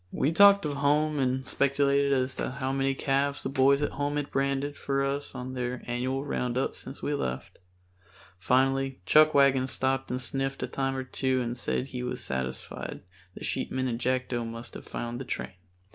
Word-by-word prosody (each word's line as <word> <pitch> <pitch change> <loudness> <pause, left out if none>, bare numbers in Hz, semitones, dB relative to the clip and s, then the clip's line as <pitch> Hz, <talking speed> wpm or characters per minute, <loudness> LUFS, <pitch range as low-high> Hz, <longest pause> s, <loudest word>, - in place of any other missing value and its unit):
We 145 - +1
talked 200 +1 +7
of 145 -2 -2
home 150 +1 +2
and 130 0 0
speculated 140 0 +2
as 130 -1 +1
to - - -3
how 130 0 -2
many 135 0 +1
calves 140 +1 0
the - - -2
boys 140 +1 +4
at - - 0
home 145 +1 -2
had 145 -1 -3
branded 140 +1 0
for 135 0 -1
us 140 +1 -3
on 125 +1 -5
their 125 0 -3
annual 130 +3 -2
roundups 125 -2 -1
since 135 - -8
we 145 - 0
left. 65 - -4 0.8
Finally 135 +5 +2
Chuckwagon 140 - +5
stopped 135 0 -1
and 125 - -2
sniffed 135 +1 -2
a - - -1
time 135 -1 -1
or 130 - -2
two 130 0 0
and 120 0 -2
said 125 +2 -2
he 125 -1 -5
was 125 0 -4
satisfied 65 -1 -4 0.3
the - - -9
sheepmen 130 0 -1
and 120 -2 -2
Jackdo 125 -1 0
must 115 +1 -7
have - - -10
found 120 +1 -4
the - - -3
train. - - -4
135 Hz, 185 wpm, -28 LUFS, 125-140 Hz, 0.8 s, talked